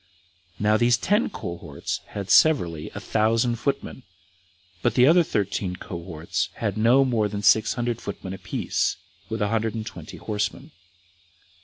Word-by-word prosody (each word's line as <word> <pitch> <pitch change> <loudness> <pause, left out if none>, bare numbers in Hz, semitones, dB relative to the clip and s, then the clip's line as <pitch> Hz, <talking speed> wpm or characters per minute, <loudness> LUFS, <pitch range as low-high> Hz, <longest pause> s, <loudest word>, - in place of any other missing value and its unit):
Now 105 +1 +3
these 120 +1 +4
ten 210 - +1
cohorts 85 - -5
had 100 -2 -5
severally 85 - +4
a - - -4
thousand 115 +2 +1
footmen, 130 +1 -3 0.8
but - - +1
the 125 - +6
other 170 +5 +6
thirteen 100 - -1
cohorts 85 0 -4
had 105 -4 -2
no 120 +5 +4
more 115 -5 +1
than 105 0 -5
six 110 +2 +4
hundred 120 -2 -2
footmen 95 -2 -6
apiece, 95 -1 -1 0.3
with 110 -1 -1
a 105 - 0
hundred 115 0 0
and 110 -1 -4
twenty - - -9
horsemen. 105 -1 -3
110 Hz, 145 wpm, -24 LUFS, 95-120 Hz, 0.8 s, the